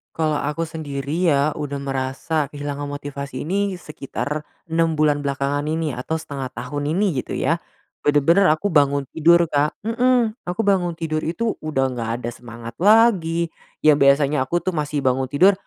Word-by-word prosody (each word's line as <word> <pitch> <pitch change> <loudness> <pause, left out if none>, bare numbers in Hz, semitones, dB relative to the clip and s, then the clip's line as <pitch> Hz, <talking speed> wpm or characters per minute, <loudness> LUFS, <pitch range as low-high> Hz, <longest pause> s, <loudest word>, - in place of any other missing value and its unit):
Kalau 155 -2 0
aku 150 +3 -2
sendiri 155 +1 -2
ya, 145 +1 +2
udah 145 -1 -4
merasa 140 +3 -2
kehilangan 145 0 -5
motivasi 140 -1 -6
ini 195 +1 -1
sekitar 150 -1 -5 0.2
6 165 -1 +1
bulan 150 -1 +2
belakangan 140 0 -1
ini 160 -3 -1
atau 145 +7 -3
0,5 140 -5 -6
tahun 145 +5 -4
ini, 205 0 +3
gitu - - -5
ya. 165 +1 0 0.4
Bener-bener 160 +6 +4
aku 165 +4 +1
bangun 140 -1 +3
tidur, 170 +2 +5
Kak 145 -1 0
mhm, 240 -1 +2
aku 180 +5 -1
bangun 180 -4 +2
tidur 155 -1 -1
itu 220 +8 -1
udah 135 -4 0
nggak 115 -2 -3
ada 120 - -2
semangat 115 -1 -10
lagi, 185 -6 +4 0.3
yang 150 -1 +6
biasanya 140 +1 +4
aku 175 - +1
tuh 185 -1 -1
masih 150 -2 -2
bangun 130 0 +1
tidur, 185 +8 +5
150 Hz, 160 wpm, -22 LUFS, 140-170 Hz, 0.4 s, yang